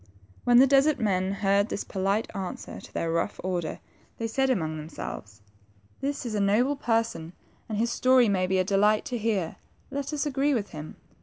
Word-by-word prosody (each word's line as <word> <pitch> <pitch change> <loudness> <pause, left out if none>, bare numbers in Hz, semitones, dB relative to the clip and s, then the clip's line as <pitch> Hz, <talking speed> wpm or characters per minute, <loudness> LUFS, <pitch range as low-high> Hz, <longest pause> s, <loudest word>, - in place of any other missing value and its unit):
When 245 0 +6
the 260 - +8
desert 275 +2 +4
men 190 -4 +1
heard 200 +1 +2
this - - -3
polite 195 +4 -1
answer 190 -2 -6
to - - -13
their 165 - -2
rough 170 0 -1
order, 175 -4 -2
then - - -28 0.4
they 230 - -3
said 265 +4 +1
among 160 -11 0
themselves, 110 -9 -7 0.6
^^This 280 -1 -2
is 235 - -3
a 210 - 0
noble 225 +8 +3
person, 225 - -1 0.4
and 215 - -2
his 235 +2 +1
story 255 0 +4
may 185 -3 +1
be 190 +1 +1
a 185 - +3
delight 205 +3 +3
to 245 - -3
hear; 205 -7 -1 0.3
let 280 +1 -3
us 300 0 -1
agree 280 0 +1
with 210 -4 -2
him." 155 0 -8
210 Hz, 190 wpm, -27 LUFS, 185-250 Hz, 0.6 s, the